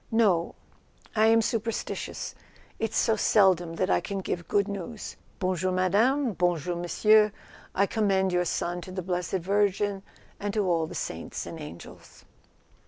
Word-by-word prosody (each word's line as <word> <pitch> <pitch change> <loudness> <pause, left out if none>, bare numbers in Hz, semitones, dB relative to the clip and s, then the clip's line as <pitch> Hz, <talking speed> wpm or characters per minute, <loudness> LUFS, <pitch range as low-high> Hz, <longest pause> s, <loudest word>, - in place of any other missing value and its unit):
"No. 205 -7 +2 0.6
I 215 0 +5
am 225 0 +5
super¬ 230 0 -1
stitious; - - -5 0.5
it's 225 0 -1
so 225 - +3
seldom 185 -6 +3
that 185 +3 0
I - - +3
can 200 - -4
give 175 -3 -3
good 200 -1 +2
news. 200 +2 -6 0.2
Bon 185 -1 0
jour, 185 +2 -1
madame, 220 +8 +2
bonjour, 175 -1 0
monsieur. 210 +5 +4 0.4
I 200 - +4
commend 195 -3 +1
your 180 0 +2
son 175 +1 -2
to 185 - -9
the 185 0 -4
blessed 180 0 -3
Virgin 200 +1 +1 0.4
and 205 +1 -3
to 210 -2 +1
all 165 -2 +1
the - - -9
saints 80 - -5
and 165 - -7
angels." 150 - -11
190 Hz, 160 wpm, -27 LUFS, 175-210 Hz, 0.6 s, I